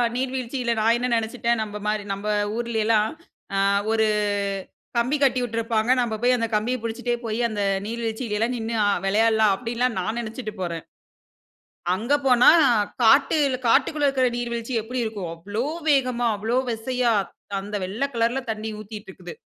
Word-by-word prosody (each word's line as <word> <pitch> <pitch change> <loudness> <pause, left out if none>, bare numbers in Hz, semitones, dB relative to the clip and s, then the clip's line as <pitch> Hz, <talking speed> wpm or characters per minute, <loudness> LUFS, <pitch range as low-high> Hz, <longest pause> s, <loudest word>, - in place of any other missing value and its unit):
நீர்வீழ்ச்சியில 255 -1 -1
நான் 225 +2 +4
என்ன 250 +1 -1
நெனைச்சிட்டேன், 235 +1 0
நம்ப 210 -1 -6
மாரி 210 -1 0
நம்ப 200 +2 -6 0.3
ஊர்லேலாம், 220 -2 +1 0.4
அ - - +1 0.3
ஒரு 220 -1 +3 0.9
கம்பி 250 +5 +2
கட்டி 265 -2 +3
விட்டுருப்பாங்க. 230 -1 -1
நம்ம 235 -2 -1
போய் 250 +1 +4
அந்த 230 -1 -1
கம்பிய 225 +4 0
புடிச்சிட்டே 240 +1 -2
போயி, 220 0 -2
அந்த 210 -2 -3 0.3
நீர்வீழ்ச்சியிலலாம் 230 0 -2
நின்னு 230 0 -3
அ - - +3 0.2
வெளையாடலாம் 220 +1 +3
அப்டின்லாம் 240 +1 -1
நான் 215 +6 -2
நெனைச்சிட்டு 225 -1 -5
போறேன். 170 -3 -3 1.1
அங்க 230 +8 -1
போனா 250 -2 +6 0.5
காட்டு 275 +6 +5 0.3
காட்டுக்குள்ள 290 +5 +3
இருக்கிற 260 -2 +2
நீர்வீழ்ச்சி 235 0 -3
எப்டி 250 +4 -4
இருக்கும்? 205 -6 -4
அவ்ளோ 205 +8 -4 0.2
வேகமா, 255 -4 +2
அவ்ளோ 225 +4 -1
வெசையா 245 +1 0 0.5
அந்த 205 +2 -6
வெள்ள 205 +8 -3
கலர்ல 235 +3 +1
தண்ணீ 220 0 -4
ஊத்திட்டு 215 -1 -9
இருக்குது. 180 -2 -10
230 Hz, 140 wpm, -24 LUFS, 215-245 Hz, 1.1 s, போனா